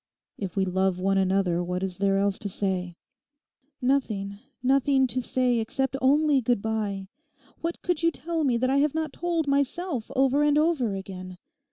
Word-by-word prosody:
If 195 -4 -5
we 195 -1 +1
love 190 0 0
one 195 +1 +2
another, 185 -2 +1
what 180 +1 -3
is 185 -1 -3
there 195 0 +2
else 200 0 +1
to 205 - -4
say?' 180 -3 -2 0.9
'Nothing, 215 -7 0 0.2
nothing 270 +1 +3
to 255 +1 -2
say, 250 -1 +1
except 265 +4 -1
only 285 +1 +4
good 240 -1 +1
bye. 210 -3 -2 0.5
What 335 +1 -4
could 350 -3 0
you 335 - +4
tell 330 0 -3
me 255 -4 +2
that 255 +2 +1
I 275 - +3
have 295 +1 +2
not 315 -3 -2
told 335 -3 -1
myself 280 -1 -1
over 270 +2 +3
and 295 0 +3
over 300 -10 +1
again? 185 -1 -8
245 Hz, 175 wpm, -26 LUFS, 195-280 Hz, 0.9 s, only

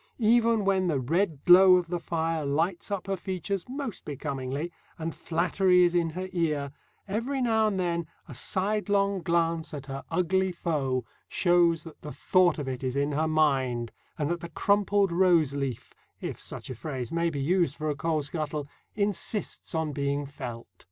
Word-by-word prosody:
Even 230 -2 +3
when 190 -2 +2
the 150 -5 +1
red 160 +3 0
glow 185 +1 +9
of 180 -2 0
the 175 0 -1
fire 165 -1 -1
lights 165 +8 -1
up 200 -3 -3
her 195 0 -1
features 190 +2 -4
most 265 -4 -5
becomingly, 140 +2 -4 0.3
and 165 0 -4
flattery 180 +2 +2
is 175 0 +3
in 170 -2 +2
her 185 +4 -5
ear, 150 -5 0 0.4
every 235 +7 -2
now 220 -3 +3
and 195 -3 -1
then 170 -2 -1 0.2
a - - -9
sidelong 200 - 0
glance 165 -2 0
at 140 -2 -7
her 135 0 -6
ugly 190 +1 +1
foe 140 -8 -1 0.2
shows 170 -3 +3
that 165 -2 -12
the 150 - -7
thought 180 0 +3
of 145 -3 -4
it 130 0 -4
is 130 0 -2
in 140 +1 +1
her 155 +2 +1
mind, 135 -7 +1 0.3
and 150 -3 0
that 175 - -1
the 170 0 -7
crumpled 200 +2 +2
roseleaf, 155 -8 +1 0.3
if - - -5
such - - -7
a - - -3
phrase 130 -1 -5
may 170 0 +1
be 145 -3 -4
used 170 0 +1
for 155 - -4
a 150 - 0
coal 155 0 0
scuttle, 150 -1 -3 0.3
insists 205 -2 -2
on 160 -2 0
being 140 0 -1
felt. 125 -4 -7
170 Hz, 175 wpm, -28 LUFS, 145-190 Hz, 0.4 s, glow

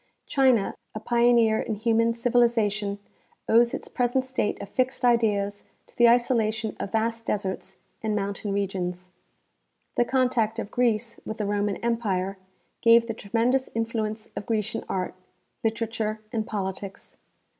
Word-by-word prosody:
China, 260 -7 +3 0.2
a - - -3
pioneer 235 -1 +3
in 220 - -2
human 230 +1 +2
civilization, 230 -4 +2 0.5
owes 235 +1 +5
its - - -5
present 250 +1 0
state 260 -5 -1
of - - -6
fixed 255 +2 0
ideas 205 -4 +2 0.2
to - - -21
the 240 -1 +6
isolation 225 -3 +2
of 195 - -4
vast 230 +1 -1
deserts 190 -1 -3 0.2
and 215 -1 -1
mountain 200 0 -2
re 200 0 +1
gions. 180 -1 -5 0.9
The 240 - +4
contact 245 -4 +1
of 220 -2 -4
Greece 235 -1 0
with 220 - -5
the 210 - -2
Roman 205 0 0
empire 195 -5 -1 0.4
gave 230 0 +6
the 230 - -3
tremendous 235 +5 0
influence 225 -1 -2
of - - -5
Grecian 225 0 -1
art, 185 -1 -2 0.5
literature 225 -1 -1
and 220 -1 -1
politics. 195 -2 -5
225 Hz, 140 wpm, -26 LUFS, 205-235 Hz, 0.9 s, the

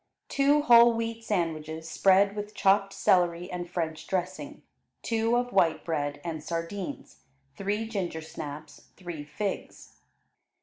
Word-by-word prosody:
Two 285 +1 +3
whole 235 -2 +7
wheat 230 0 -3
sandwiches 160 -5 -2
spread 195 +3 +4
with 210 0 -6
chopped 195 0 +3
celery 175 -2 +2
and 175 -1 -5
French 160 -3 -3
dressing, 190 - -4 0.4
two 230 +1 +1
of 245 0 -2
white 165 -5 +2
bread 145 -3 -2
and 160 -3 -5
sardines; 170 - -5 0.4
three 205 +3 -2
gingersnaps; 160 -6 -6
three 175 -5 -7
figs. 190 +7 -5
185 Hz, 120 wpm, -28 LUFS, 160-220 Hz, 0.4 s, whole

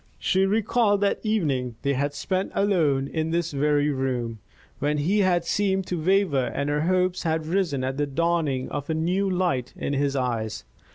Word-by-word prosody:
She 190 0 +2
recalled 210 0 +2
that 200 - +1
evening 145 - 0
they 140 - +1
had 140 +2 -1
spent 185 +6 -2
alone 155 -9 +2
in 160 +2 -2
this 170 0 -1
very 145 +1 +2
room, 125 -4 -2 0.4
when 150 +2 0
he 180 +9 +1
had 180 -3 +2
seemed 190 +1 0
to 175 -4 -3
waver 180 -8 +2
and 140 +1 -1
her 150 0 0
hopes 185 +2 +1
had 160 -2 -1
risen 165 -6 0
at 130 +1 -2
the 145 0 0
dawning 155 -3 0
of 145 0 -5
a 160 - 0
new 180 +5 0
light 175 -9 -1
in - - -2
his 140 0 0
eyes. 115 -4 -2
160 Hz, 180 wpm, -25 LUFS, 140-185 Hz, 0.4 s, She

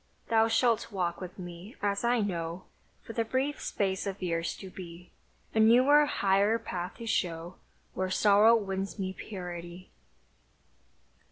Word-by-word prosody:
Thou 225 0 +5
shalt 230 0 +2
walk 180 -3 -2
with 180 -1 -8
me, 175 +4 -9
as 200 +1 -1
I 240 -1 +2
know, 170 -3 -3 0.4
For 225 - -8
the 230 - 0
brief 265 +5 -1
space 190 -1 -1
of 195 0 -4
years 170 -2 -2
to 190 -2 -9
be; 175 -1 -10 0.4
A 220 - +1
newer, 255 +7 +6
higher 200 -1 +2
path 180 -5 -5
to 230 - -8
show 175 -4 -2 0.4
Where 185 0 -2
sorrow 210 +4 +5
wins 195 -2 -3
me 190 -2 -3
purity! 180 -3 -8
195 Hz, 145 wpm, -29 LUFS, 180-225 Hz, 0.4 s, newer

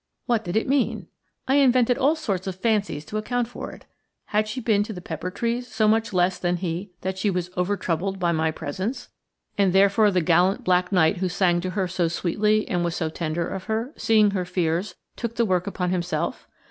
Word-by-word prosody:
What 235 -3 +1
did 175 +2 -2
it 220 - 0
mean? 275 0 0 0.4
I 270 - +3
invented 250 -3 +4
all 285 +6 +2
sorts 200 - -3
of 190 - -3
fancies 200 -7 0
to 215 +7 -3
account 245 +2 -1
for 245 - -7
it. - - -14 0.4
Had 210 +1 0
she 215 +5 -4
been 220 -4 +2
to 215 +1 -3
the 180 - -7
pepper 175 0 -5
trees 235 +5 -2
so 220 -2 +1
much 225 +1 +2
less 180 -1 +1
than 175 -1 0
he 175 +2 -4
that 190 0 -3
she 205 - +1
was 180 -1 -2
over 180 +3 0
troubled 190 +3 -2
by 175 -2 +1
my 160 -1 +1
presence, 165 - -4 0.5
and 195 -3 +3
therefore 200 +2 +5
the 185 -2 +2
gallant 175 +4 +3
black 180 0 +2
knight 180 0 +3
who 185 +1 -1
sang 175 -1 +2
to 185 - -3
her 190 -2 +1
so 175 -1 0
sweetly 210 +6 +1
and 175 -1 0
was 170 -1 -1
so 160 - -1
tender 165 +1 -2
of 190 -1 -5
her, 225 +6 -2
seeing 215 -2 +3
her 190 -2 -1
fears, 180 +1 -1 0.2
took 235 -1 -4
the 235 - +2
work 185 -2 0
upon 180 -2 -2
himself? 180 0 -2
190 Hz, 215 wpm, -24 LUFS, 175-220 Hz, 0.5 s, therefore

